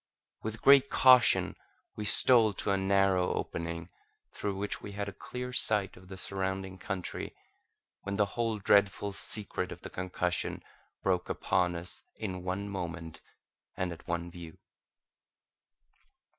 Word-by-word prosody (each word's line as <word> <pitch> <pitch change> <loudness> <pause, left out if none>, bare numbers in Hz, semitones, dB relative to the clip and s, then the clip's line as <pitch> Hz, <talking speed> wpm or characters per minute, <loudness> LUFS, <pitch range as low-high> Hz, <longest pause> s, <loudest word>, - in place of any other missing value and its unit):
With 110 +1 -6
great 140 0 +7
caution 130 -2 +5 0.4
we 105 - -5
stole 115 -1 +6
to 100 - 0
a - - +3
narrow 95 -1 +2
opening, 85 +1 -4 0.4
through 100 -2 -3
which 100 +1 -3
we 100 - -8
had 100 0 -3
a 100 - -6
clear 125 +5 -7
sight 105 -5 +1
of 90 0 -16
the 95 0 -9
surrounding 95 0 -3
country, 95 -1 -5 0.7
when 100 0 -4
the 105 0 +3
whole 115 -2 -1
dreadful 100 0 +2
secret 100 -2 0
of 90 - -9
the - - -8
concussion 90 -1 -2 0.4
broke 90 -2 0
upon 90 -2 0
us 85 +2 -3
in 95 -4 -5
one 95 +3 -3
moment 85 -4 -6 0.6
and 90 -1 -1
at 85 - -15
one 85 0 -3
view. 85 -2 -10
95 Hz, 140 wpm, -30 LUFS, 90-105 Hz, 0.7 s, great